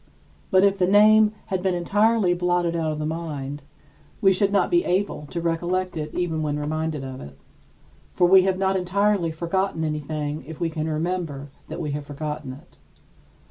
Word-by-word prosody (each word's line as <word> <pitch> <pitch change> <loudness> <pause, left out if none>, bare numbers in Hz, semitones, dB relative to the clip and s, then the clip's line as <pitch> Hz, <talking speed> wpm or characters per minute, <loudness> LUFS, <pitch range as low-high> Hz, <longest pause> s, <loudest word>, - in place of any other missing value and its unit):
But 185 0 +4
if 200 -1 +3
the 180 - +3
name 210 +2 +6 0.2
had 185 - 0
been 185 -1 0
entirely 205 +2 +2
blotted 175 -1 0
out 160 -2 0
of 155 - -4
the 150 - -3
mind, 150 -3 -4 0.6
we 195 -1 +5
should 195 +1 +1
not 205 - +2
be 345 0 +4
able 180 -5 -1
to 170 - -4
recollect 175 +2 -1
it 155 -1 -4
even 165 -3 -1
when 150 -1 -1
reminded 155 0 -2
of 130 0 -7
it. 70 -1 -11 0.7
For 180 - +2
we 190 +2 +7
have 190 0 0
not 190 0 +1
entirely 190 0 +1
forgotten 170 +1 -1
anything 150 -1 -3
if 160 -1 -9
we 165 -1 -1
can 160 0 -3
remember 155 -3 -3 0.2
that - - -6
we 155 -4 -3
have 145 0 -5
forgotten 150 -1 -5
it. 135 - -17
170 Hz, 180 wpm, -24 LUFS, 150-190 Hz, 0.7 s, we